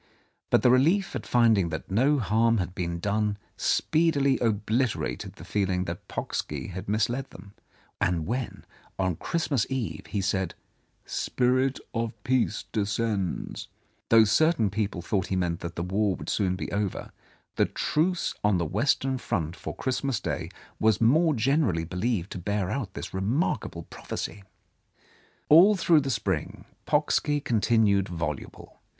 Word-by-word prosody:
But - - +3
the 125 - +6
relief 170 +9 +3
at - - -5
finding 110 -7 +4
that 80 +3 -6
no 135 +9 +3
harm 115 0 +2
had 90 -2 -2
been 85 -2 -3
done 105 +2 0 0.2
speedily 145 -4 +2
obliterated 115 +2 -1
the - - -12
feeling 95 -3 0
that 85 -1 -6
Pocksky - - -4
had 95 +2 -6
misled 120 +6 0
them, 100 +2 -13 0.5
and 85 -3 +1
when, 125 +2 -4 0.3
on 95 -3 0
Christmas 145 - -1
Eve, 130 -4 -3
he 105 - -2
said, 95 -2 -1 0.5
"Spirit 130 +1 +1
of 115 0 -2
Peace 125 -5 0
descends," 105 -3 -2 0.4
though 115 -1 +7
certain 115 - +3
people 100 -4 -2
thought 95 0 -1
he 95 - -1
meant 90 -2 -1
that 85 0 -6
the 85 - -2
War 95 +2 +1
would - - -7
soon 95 -3 +1
be 95 - -5
over, 100 -2 -2 0.4
the - - +3
truce 170 +3 0
on 105 -2 +3
the 85 - 0
Western 130 - +1
Front 85 -9 -2
for - - -7
Christmas 130 -2 -1
Day - - -3 0.3
was 110 -2 +3
more 155 +7 +4
generally 120 - +1
believed 90 +2 -2
to - - -5
bear 100 +1 -1
out 110 -6 -4
this - - -6
remarkable 100 - -1
prophecy. 100 +4 -6 1.0
All 180 +8 +7
through 165 -4 +4
the 135 - -3
spring 95 - -2 0.2
Pocksky 150 0 +2
continued 110 -6 +2
voluble. 85 -4 -6
110 Hz, 145 wpm, -27 LUFS, 95-130 Hz, 1.0 s, though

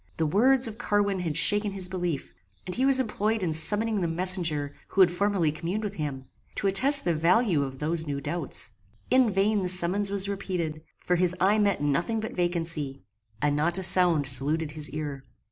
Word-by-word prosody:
The 160 - 0
words 245 - +3
of 220 0 -9
Carwin 205 -4 0
had 165 -4 -2
shaken 205 -1 +3
his 190 -2 0
belief, 175 -6 -4 0.3
and 180 - -6
he 260 +6 +1
was 270 -1 +7
employed 220 -3 -1
in 165 -3 -1
summoning 205 +7 +4
the 170 - 0
messenger 165 -4 0
who 195 - +1
had 180 -2 +5
formerly 185 -3 0
communed 175 +8 -4
with 205 -2 -4
him, 145 -7 -5 0.3
to - - -3
attest 270 +9 +4
the 175 - +1
value 170 +2 +2
of 135 -1 -5
those 160 +2 -2
new 140 -1 -3
doubts. 170 +5 -4 0.4
In 255 -2 +4
vain 200 +1 +1
the 180 - -2
summons 185 +3 +1
was 200 -1 -2
repeated, 180 -6 -4 0.2
for 180 - -1
his 180 0 +1
eye 200 +4 +2
met 200 -8 0
nothing 170 +10 -1
but 220 - -6
vacancy, 165 -6 -3 0.4
and 145 -1 +1
not 170 +4 0
a 190 - -3
sound 175 -5 +2
saluted 145 +4 +1
his 150 -1 -4
ear. 145 -3 -6
180 Hz, 195 wpm, -26 LUFS, 155-205 Hz, 0.4 s, was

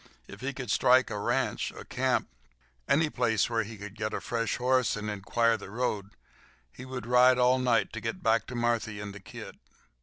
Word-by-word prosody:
If - - -11
he 130 +1 -2
could 125 -4 -5
strike 125 +1 +4
a 105 - -3
ranch—a - - -1
camp—any 60 - -2
place 120 -2 +1
where 115 -1 +2
he 110 +1 -7
could 105 0 -9
get 110 0 -3
a - - -2
fresh 115 -1 -2
horse 125 -2 +2
and 105 0 -4
inquire 115 +3 +1
the 100 - -10
road, 105 -3 -3 0.6
he 130 - -10
would 130 -2 -6
ride 125 +1 +5
all 125 +1 +4
night 125 -2 +1
to 115 - -5
get 115 0 -4
back 115 0 +2
to 125 - -6
Marthy 115 -3 0
and 105 -1 -6
the 100 - -9
kid. 95 - -10
115 Hz, 190 wpm, -29 LUFS, 105-125 Hz, 0.6 s, ride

